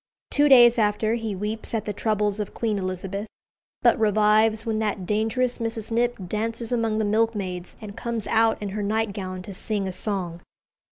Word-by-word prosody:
Two 290 0 +4
days 240 -3 +7
after 215 +1 +1
he 225 -3 -2
weeps 215 +4 -3
at 220 - -2
the 210 - -3
troubles 210 -1 0
of 210 - -4
Queen 215 -3 -1
Elizabeth, 190 +2 -4 0.6
but 235 -2 +4
revives 215 +1 +3
when 220 -1 -1
that 210 -3 -2
dangerous 225 +5 0
Mrs. 225 -1 -3
Knipp 240 +1 +1
dances 225 +4 -3
among 225 -3 0
the 220 - +1
milkmaids, 205 -5 -1
and 210 -2 -9
comes 235 -3 -3
out 225 0 +2
in 205 - -3
her 210 +2 -4
nightgown 200 -3 -2
to 200 - -8
sing 200 +1 -1
a - - -2
song. 180 -3 -3
215 Hz, 175 wpm, -24 LUFS, 200-225 Hz, 0.6 s, days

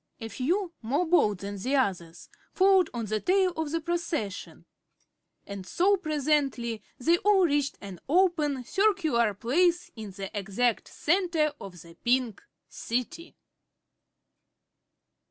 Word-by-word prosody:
A 225 -2 -6
few, 345 - -1
more 280 +10 0
bold 215 - +2
than 200 0 -6
the 260 +8 -1
others, 180 -10 -2 0.3
followed 380 -2 +4
on 235 -1 -4
at 215 - -6
the 215 0 0
tail 375 - +2
of 320 -2 -3
the 330 +2 -1
procession, 330 - -4 0.8
and 200 -1 -7
so 385 - +3
presently 290 - -1 0.2
they 335 +7 +2
all 400 -2 +4
reached 290 -3 0
an 195 -3 -9
open, 310 -6 +2
circular 315 - +1
place 345 - +1
in 220 -3 -7
the 195 +1 -8
exact 210 +4 -1
center 330 -3 0
of 185 -3 -9
the 165 -1 -15
Pink 245 -3 +1 0.3
City. 330 +9 -4
285 Hz, 130 wpm, -27 LUFS, 220-345 Hz, 0.8 s, followed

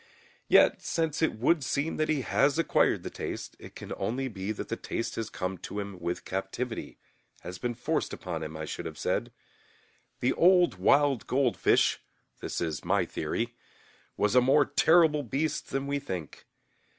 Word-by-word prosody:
Yet, - - +5
since 160 -2 -1
it 160 - +2
would 145 +6 +2
seem 140 +4 -1
that 155 - 0
he 150 -3 +1
has 140 +3 +2
acquired 165 - +2
the - - -5
taste, - - -6
it - - -12
can - - -7
only 130 +4 -2
be 100 -3 -4
that 110 - -5
the 115 - -1
taste 115 - -4
has 115 -1 -4
come 90 -1 -4
to 100 - -7
him 100 -2 -6
with 85 +1 -4
captivityŌĆöhas 95 - -6
been 120 -1 -2
forced - - -1
upon 85 -3 -5
him, 80 0 -6
I 80 - -4
should - - -5
have - - -8
said. - - -1 0.9
The 125 +2 +2
old 180 0 +4
wild 140 -4 +3
goldfish 130 -2 +2 0.4
(this - - -4
is 80 -3 -2
my - - +2
theory) 115 +10 -3 0.6
was 105 +1 +2
a 125 - +6
more 135 +3 +4
terrible 160 -1 +4
beast 145 +4 -2
than 135 0 -2
we 140 0 -1
think. 95 - -7
125 Hz, 170 wpm, -29 LUFS, 95-145 Hz, 0.9 s, a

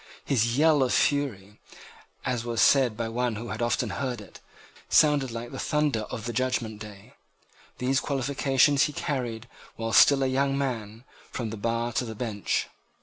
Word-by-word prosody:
His 120 -2 +1
yell 155 -1 +4
of 130 - +2
fury, 110 -9 0 0.7
as 125 -3 -1
was 120 -1 -3
said 130 -6 +4
by 115 - -2
one 120 0 -1
who 115 +2 -6
had 110 - -5
often 120 -1 0
heard 125 +3 -3
it, 105 - -13 0.5
sounded 145 -3 +4
like 115 +1 -6
the 135 - -7
thunder 145 -8 0
of 115 -3 -6
the 120 - -3
judgment 125 -4 -1
day. 105 -2 -11 0.6
These 130 +1 +1
qualifications 135 0 +2
he 150 - -4
carried, 120 -6 -3 0.3
while 115 0 -4
still 140 -1 +6
a - - +2
young 135 +1 +1
man, 115 -5 -4 0.3
from 115 -3 -4
the - - -4
bar 115 +2 -2
to 125 - 0
the 110 -1 -7
bench. 105 -3 -2
120 Hz, 170 wpm, -26 LUFS, 115-135 Hz, 0.7 s, still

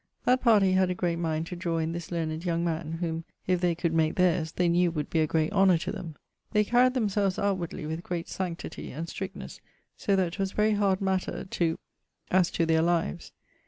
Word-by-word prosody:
That 255 +1 +3
party 210 -6 +5
had 185 0 +3
a 180 - -1
great 175 -2 -1
mind 160 -1 -1
to 180 - -6
drawe 170 -2 -2
in 160 0 -1
this 170 0 -6
learned 160 -1 -2
young 170 -2 0
man, 165 -1 -2
whom 165 -1 -2 0.2
if 180 -1 +1
they 175 -2 +2
could 170 -1 -1
make 160 -1 +2
theirs, 170 -3 +2
they 180 +1 +1
knew 175 +1 +3
would 150 -3 -4
be 165 - +2
a 155 - +3
great 160 +3 0
honour 195 -3 +5
to 160 - -4
them. 175 -7 -7 0.4
They 210 -1 +4
carried 250 +4 +3
themselves 205 -5 +1
outwardly 185 -6 -2
with 160 +2 -4
great 175 -1 -4
sanctity 180 -3 -5
and 160 +5 -5
strictnesse, 190 +2 -7 0.4
so 200 -6 +1
that 180 -3 +1
'twas 195 0 -2
very 215 +1 +2
hard 200 -2 +1
matter 190 -1 -1
to 170 -3 -1 0.5
as 180 -1 +4
to 165 - 0
their 160 0 +3
lives. 170 - 0
175 Hz, 210 wpm, -28 LUFS, 165-190 Hz, 0.5 s, party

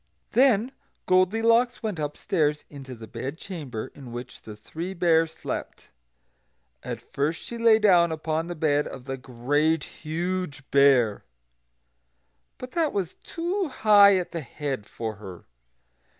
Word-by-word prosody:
Then 250 -2 +4 0.3
Goldilocks 225 +7 +3
went 210 -7 -3
upstairs 150 0 -1
into 135 -3 -9
the 115 -1 -10
bed 130 +7 -6
chamber 150 - -6
in 130 -4 -11
which 120 +1 -8
the 110 - -10
Three 165 - -7
Bears 165 -2 +3
slept. - - -7 0.9
And - - -5
first 150 +4 -2
she 235 - -7
lay 230 -1 +6
down 180 -6 +4
upon 160 +1 -2
the 175 - -5
bed 150 -2 +1
of 125 - -9
the 135 -1 -3
Great 140 +5 0
Huge 170 -1 -4
Bear; 135 -7 +4 1.3
but 255 0 -8
that 325 -3 0
was 190 -5 -2
too 355 +3 -3
high 205 -6 +6
at 180 - -3
the 165 - -4
head 135 -5 -5
for 110 -3 -5
her. 95 -4 -10
160 Hz, 135 wpm, -26 LUFS, 135-200 Hz, 1.3 s, lay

